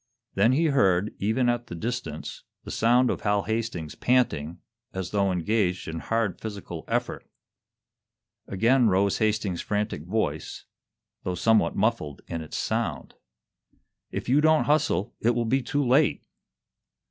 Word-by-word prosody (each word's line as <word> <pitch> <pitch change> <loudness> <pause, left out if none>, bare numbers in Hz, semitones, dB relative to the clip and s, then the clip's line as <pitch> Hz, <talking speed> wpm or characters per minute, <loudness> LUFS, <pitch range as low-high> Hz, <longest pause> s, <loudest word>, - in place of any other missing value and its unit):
Then 110 +6 +3
he 160 +5 +2
heard, 100 - +2
even 110 +5 +1
at 120 0 0
the - - -7
distance, 120 +8 -5 0.2
the - - -8
sound 120 +2 +3
of - - -4
Hal 105 -1 +1
Hastings 110 -8 -3
panting, 85 - +1 0.4
as 95 -2 -4
though 100 -2 +1
engaged 90 0 0
in 80 +1 -4
hard 110 -1 -1
physical 105 -3 -6
effort. - - -2 1.2
Again 115 +5 +3
rose 100 0 +2
Hastings's 105 -5 0
frantic 105 -6 -2
voice, 90 -7 -2 0.6
though 90 - -3
somewhat 110 +5 +3
muffled 100 - -1
in 85 -1 -4
its 80 - -6
sound. - - -2 1.0
"If - - -5
you 135 +5 +4
don't 155 0 +4
hustle, 145 -9 +1
it 120 +1 +2
will 120 -1 0
be 130 +4 +1
too 145 +3 -1
late!" 140 +5 +3
110 Hz, 140 wpm, -26 LUFS, 95-120 Hz, 1.2 s, you